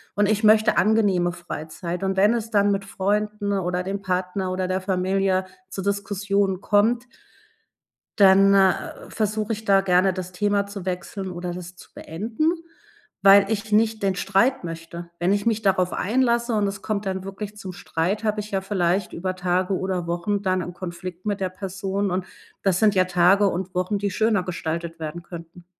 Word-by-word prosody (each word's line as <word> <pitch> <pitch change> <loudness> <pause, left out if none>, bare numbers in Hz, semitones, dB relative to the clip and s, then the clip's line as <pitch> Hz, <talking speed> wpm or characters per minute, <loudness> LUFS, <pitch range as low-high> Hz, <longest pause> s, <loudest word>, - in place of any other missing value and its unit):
und 205 0 +2
ich 215 +1 +1
möchte 215 +1 +5
angenehme 200 -5 +3
Freizeit. 175 +1 -6
Und 190 0 0
wenn 205 +4 +5
es 230 -1 -3
dann 205 -2 +3
mit 195 0 -1
Freunden 205 +1 -1
oder 180 -2 -1
dem 195 +2 -4
Partner 185 0 -2
oder 185 0 -1
der 185 0 0
Familie 190 0 0 0.2
zu 195 - -5
Diskussionen 200 -1 -1
kommt 225 +4 +2 1.1
dann, 195 0 +7
äh, 190 -1 +1
versuche 215 0 -1
ich 220 +1 -7
da 195 -2 +5
gerne 185 0 +3
das 185 -1 -6
Thema 200 +2 0
zu 200 -2 -8
wechseln 185 +1 -4
oder 175 0 -5
das 180 0 -8
zu - - -16
beenden, 220 - -3 0.8
weil 195 0 +8
ich 215 0 -2
nicht 220 0 +2
den 195 -1 +1
Streit 200 +8 +1
möchte. 165 +1 -7
Wenn 175 +3 +1
ich 205 0 -1
mich 220 -1 +1
darauf 185 -2 +2
einlasse 235 +2 +1
und 210 -2 +2
es 195 0 -5
kommt 205 -2 -2
dann 190 -1 -3
wirklich 200 +2 -7
zum 190 -2 -7
Streit, 195 +1 -2
habe 215 -1 0
ich 210 - -10
ja 195 -1 0
vielleicht 190 -1 0
über 185 +2 -3
Tage 185 +1 0
oder 185 -2 -2
Wochen 185 +4 -2
dann 185 -1 +1
'n 180 - -6
Konflikt 180 +1 -7
mit 205 -1 -1
der 185 - 0
Person 195 +1 -3
und 185 0 -1 0.4
das 190 -3 +2
sind 215 -2 +4
ja 185 -2 +3
Tage 185 +3 +4
und 185 0 -3
Wochen, 185 +3 0
die 200 -1 -2
schöner 215 -1 +1
gestaltet 165 -1 -4
werden 160 +2 -6
könnten. 170 0 -11
195 Hz, 180 wpm, -23 LUFS, 180-205 Hz, 1.1 s, weil